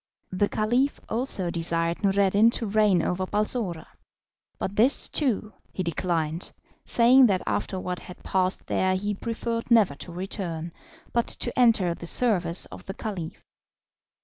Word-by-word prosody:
The 195 +2 0
Caliph 245 +6 0
also 220 -7 0
desired 170 +2 -1
Noureddin 200 +2 +4
to 230 - 0
reign 205 -4 +2
over 185 +1 -2
Balsora, 210 -5 -2 0.7
but 195 - -4
this, 250 +7 +4
too, 225 -7 -1 0.2
he 185 - -3
declined, 170 -1 -2 0.3
saying 250 +2 +5
that 190 -3 0
after 190 - -2
what 180 -1 -4
had 180 - -13
passed 185 0 0
there 185 0 0
he 205 +2 -2
preferred 230 +2 -4
never 220 -10 +4
to 160 +5 -7
return, 170 -2 -5 0.4
but 235 -1 +1
to 240 - -3
enter 225 -8 +3
the 170 - -7
service 180 -7 +4
of - - -13
the 195 - -6
Caliph. 190 -7 -6
195 Hz, 145 wpm, -25 LUFS, 175-230 Hz, 0.7 s, saying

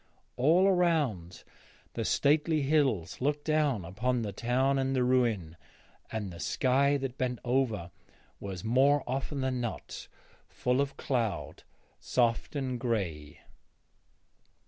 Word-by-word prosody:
All 165 +9 +4
around 150 - +1 0.5
the - - -2
stately 150 +1 +2
hills 135 - +1
looked 145 +2 -1
down 150 - +1
upon 115 +7 -1
the 105 - -3
town 130 +6 +1
and 135 0 0
the 125 - +2
ruin, 115 -10 +1 0.5
and 105 -5 -4
the 85 - -10
sky 140 +2 +2
that 135 -2 -5
bent 125 -1 -1
over 120 -8 0 0.5
was 95 -3 -6
more 135 +5 +3
often 135 +2 -3
than 130 -1 -1
not 120 -2 -6 0.4
full 125 +2 0
of 140 0 -3
cloud, 115 -6 -2 0.4
soft 120 +3 0
and 130 -3 -2
grey. 85 - -3
125 Hz, 125 wpm, -30 LUFS, 110-140 Hz, 0.5 s, All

